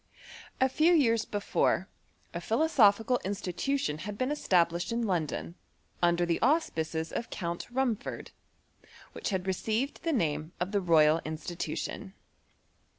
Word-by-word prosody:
A 260 - +4
few 310 +6 +3
years 230 -7 +3
before, 205 -2 0 0.5
a 170 - -4
philosophical 225 - +3
institution 190 - -2
had 205 +4 -6
been 255 +4 0
established 175 - +1
iu 230 - -1
London, 175 -8 -2 0.5
imder 175 0 +3
the 170 -1 -1
auspices 165 - 0
of 230 - -4
Count 170 -2 -4
Rumford, 245 -3 -2 0.8
wliich - - -3
bad 190 -3 -2
received 220 +8 -1
the 330 - -1
name 155 - -1
ot 180 +2 -2
the 205 -2 +1
Royal 160 -2 +4
Institution. 160 +4 -5
195 Hz, 125 wpm, -30 LUFS, 170-240 Hz, 0.8 s, A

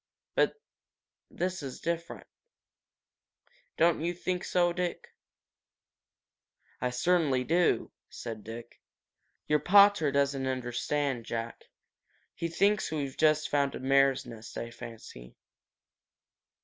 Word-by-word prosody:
But - - +1 0.7
this 185 +1 -3
is 135 -3 -7
different. 170 0 -4 1.5
Don't 170 -2 +3
you 175 +2 -1
think 180 +1 -2
so, 175 -1 +2
Dick?" 180 0 -4 1.7
"I 125 - +1
certainly 140 -1 +2
do," 170 +5 +2 0.2
said 110 -2 -7
Dick. 115 +1 -10 0.6
"Your 150 0 +2
pater 200 -5 +6
doesn't 140 -1 +1
understand, 130 0 -2
Jack. 115 0 -5 0.7
He 170 - -3
thinks 200 +5 +2
we've 140 -4 -3
just 155 -1 +3
found 140 -1 +1
a - - -5
mare's 135 0 +3
nest, 115 -2 -10
I 115 - -5
fancy." 115 - -11
140 Hz, 105 wpm, -30 LUFS, 125-170 Hz, 1.7 s, pater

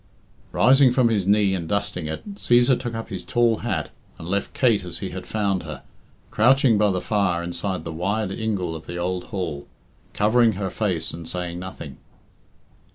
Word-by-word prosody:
Rising 135 0 +5
from 125 -2 +3
his 100 -4 0
knee 100 -1 +4
and 85 -4 -3
dusting 100 -6 -1
it, 80 - -6
Cæsar 120 -7 +3
took 120 -2 -4
up 115 - -5
his 95 -4 -6
tall 120 -2 +2
hat, - - -3 0.3
and 80 - -9
left 100 +2 -1
Kate 115 -7 +3
as 90 -2 -6
he - - -5
had - - -7
found 100 -4 0
her, - - -8 0.5
crouching 120 0 +4
by 105 -1 +4
the 95 -2 0
fire 90 -2 0
inside 85 0 -3
the 80 - -6
wide 100 +4 -1
ingle 95 -6 -2
of 80 - -10
the 85 - -5
old 90 +1 -2
hall, 80 -7 -5 0.5
covering 110 +2 +3
her 95 0 -3
face 90 -7 -1
and 80 0 -7
saying 90 -1 -4
nothing. 95 +1 -8
100 Hz, 180 wpm, -23 LUFS, 90-115 Hz, 0.5 s, Rising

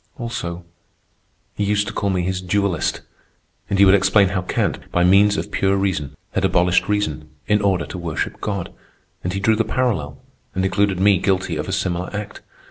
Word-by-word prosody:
Also, 90 -8 -5 0.9
he 105 - -2
used 105 0 +1
to 100 - -6
call 100 - -1
me 90 -2 0
his 95 +1 -2
dualist, 95 -2 0 0.7
and 100 - 0
he 100 - +7
would 95 - +6
explain 100 0 +4
how 95 -1 -1
Kant, 90 - -1
by 90 - +2
means 100 +3 +5
of - - -4
pure 95 0 +1
reason, 80 -8 -2 0.2
had 95 - -1
abolished 90 0 +2
reason, 80 -8 -1 0.2
in 105 0 +2
order 95 -3 +1
to 90 - -7
worship 80 -3 -4
God. 100 -4 -3 0.5
And 90 - -2
he 95 - -2
drew 110 +3 +3
the 115 - +1
parallel 105 - -1 0.4
and 95 0 0
included 100 -1 +1
me 100 -1 +4
guilty 95 -4 0
of 75 +4 -4
a - - -2
similar 90 -2 -1
act. 105 -1 -6
95 Hz, 190 wpm, -21 LUFS, 90-100 Hz, 0.9 s, he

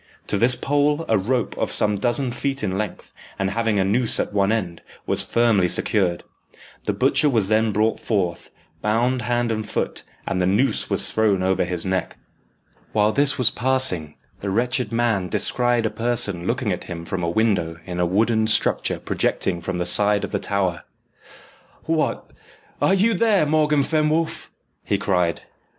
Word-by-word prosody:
To 100 - -1
this 125 +3 +4
pole 145 +4 0
a 110 - +2
rope, 115 +3 -1
of - - -1
some 105 -1 +2
dozen 125 +3 0
feet 135 +2 -3
in 95 - -1
length, 105 -1 -5 0.2
and 95 0 -1
having 115 -1 0
a 95 - +2
noose 115 +4 +2
at - - -2
one 100 0 +2
end, 90 -7 -3 0.2
was - - +1
firmly 115 -6 +2
secured. 90 -1 0 0.6
The - - +1
butcher 150 - +2
was 110 -7 +1
then 110 0 +2
brought 110 +2 0
forth, 95 -6 -2 0.3
bound 120 +4 0
hand 120 +1 -1
and 110 -1 -2
foot, - - -3 0.2
and 90 - -1
the 90 - +1
noose 105 +8 +1
was - - +1
thrown 105 -4 +1
over 95 -1 +1
his 90 0 -4
neck. 95 -1 -2 0.8
While 105 0 +3
this 140 +3 +3
was 125 -4 +4
passing, 125 - +1 0.2
the 100 - -4
wretched 125 +5 0
man 115 -6 0
descried 120 +3 +2
a 110 - -1
person 105 -7 0
looking 120 -4 -1
at 90 - -6
him 85 -2 -7
from 95 +1 -4
a 85 - -1
window 85 -5 0
in 90 -1 -5
a 90 - +2
wooden 110 +4 +1
structure 110 -1 +1
projecting 85 -3 -1
from 90 +1 -4
the 90 - -2
side 105 +3 +3
of - - -4
the - - -1
tower. 95 -4 -1 1.0
"What, 160 -1 -1 0.5
are 190 - +3
you 220 +4 +2
there, 205 -4 +2
Morgan 150 -1 +2
Fenwolf?" 155 +2 -1 0.3
he - - 0
cried. 90 -3 0
110 Hz, 170 wpm, -22 LUFS, 95-125 Hz, 1.0 s, this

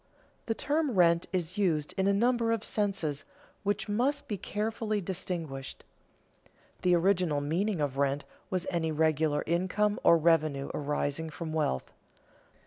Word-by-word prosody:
The 225 - 0
term 295 +5 0
rent 170 -2 +4
is 185 +1 -2
used 160 -7 +1
in 190 0 +1
a - - +5
number 230 +2 +2
of 225 -2 0
senses, 195 -9 -1 0.4
which 205 0 -1
must 275 +7 0
be 210 - -2
carefully 215 +2 -2
distinguished. 170 -7 -4 1.0
The 180 -1 +4
original 175 -4 +2
meaning 175 +7 0
of 140 -2 -1
rent 140 +1 +1 0.2
was 185 -1 -1
any 165 -2 0
regular 155 -1 +1
income 185 +5 +1
or 170 - +7
revenue 155 -4 +2
arising 145 +2 -1
from 160 0 -6
wealth. 150 - -1
175 Hz, 135 wpm, -30 LUFS, 155-205 Hz, 1.0 s, or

